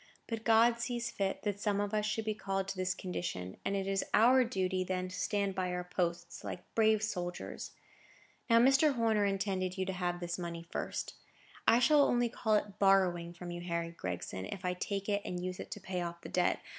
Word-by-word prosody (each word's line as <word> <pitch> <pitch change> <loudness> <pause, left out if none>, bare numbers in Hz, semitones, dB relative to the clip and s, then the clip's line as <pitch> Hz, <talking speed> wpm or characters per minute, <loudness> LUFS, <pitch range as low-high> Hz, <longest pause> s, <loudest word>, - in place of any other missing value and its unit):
But 225 -1 -4
God 230 +1 +5
sees 235 0 -2
fit 195 -1 -2
that 205 -1 -1
some 205 -1 0
of 205 0 -1
us 210 0 +1
should 215 +1 -1
be 215 - 0
called 195 -2 -2
to 195 - -3
this 185 0 -1
condition, 170 - -4
and 200 - 0
it 195 -1 -1
is 195 0 0
our 255 +4 +6
duty 190 -6 0
then 185 0 -2
to 185 - -7
stand 200 +1 0
by 185 -1 -1
our 180 0 -2
posts, 175 -1 -3
like 180 - -5
brave 220 -1 +4
soldiers. 180 -5 -4 0.8
Now, 230 - +6
Mr. 270 +4 +5
Horner 220 -3 +2
intended 195 -2 -1
you 190 - 0
to 190 - -2
have 175 -1 -2
this 175 0 -3
money 170 -1 -5
first. - - -3 0.5
I 230 - +7
shall 290 +4 +5
only 245 -3 +3
call 220 -2 +1
it 210 -1 -1
borrowing 185 -3 +3
from 175 0 -7
you, 175 0 -5
Harry 170 -1 -2
Gregson, 95 - -5
if 185 - -6
I 180 - +1
take 195 +2 -3
it 205 -1 +1
and 180 - -4
use 185 0 -4
it - - -7
to - - -6
pay 185 -2 -3
off 170 0 -5
the - - -8
debt. 180 -1 +1
195 Hz, 215 wpm, -33 LUFS, 180-215 Hz, 0.8 s, I